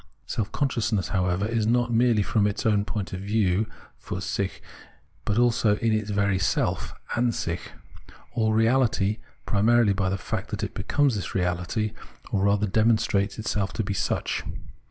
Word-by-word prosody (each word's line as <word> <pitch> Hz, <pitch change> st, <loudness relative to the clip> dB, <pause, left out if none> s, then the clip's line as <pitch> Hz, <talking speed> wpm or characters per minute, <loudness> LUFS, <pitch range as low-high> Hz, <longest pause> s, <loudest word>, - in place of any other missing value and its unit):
Self 105 Hz, -1 st, -3 dB
consciousness, 115 Hz, -8 st, 0 dB
however, 90 Hz, 0 st, 0 dB
is 110 Hz, -1 st, 0 dB
not 120 Hz, 0 st, +2 dB
merely 115 Hz, -2 st, +4 dB
from 105 Hz, 0 st, +2 dB
its 105 Hz, -, -3 dB
own 105 Hz, -2 st, +3 dB
point 105 Hz, -4 st, -4 dB
of 95 Hz, -, -3 dB
view 100 Hz, 0 st, +1 dB, 0.4 s
{fiir -, -, -4 dB
sich) 90 Hz, +2 st, -2 dB, 0.7 s
but 105 Hz, -, 0 dB
also 120 Hz, -3 st, +3 dB
in 115 Hz, +1 st, +1 dB
its 110 Hz, -1 st, -1 dB
very 100 Hz, -2 st, +1 dB
self -, -, 0 dB, 0.2 s
[an 120 Hz, 0 st, +2 dB
sich) 85 Hz, -3 st, -3 dB, 0.6 s
all 110 Hz, -2 st, +1 dB
reahty, 110 Hz, -2 st, +2 dB, 0.3 s
primarily 110 Hz, 0 st, +4 dB
by 95 Hz, -1 st, 0 dB
the 95 Hz, -, -1 dB
fact -, -, -4 dB
that -, -, -4 dB
it -, -, -3 dB
becomes 145 Hz, -3 st, +1 dB
this 100 Hz, -, -5 dB
reahty, 90 Hz, +4 st, -1 dB, 0.4 s
or 100 Hz, -1 st, +1 dB
rather 100 Hz, +1 st, +3 dB
demonstrates 110 Hz, -1 st, +2 dB
itself 105 Hz, -4 st, -1 dB
to 110 Hz, -, -1 dB
be 100 Hz, -, -2 dB
such. -, -, -1 dB
105 Hz, 160 wpm, -26 LUFS, 100-115 Hz, 0.7 s, merely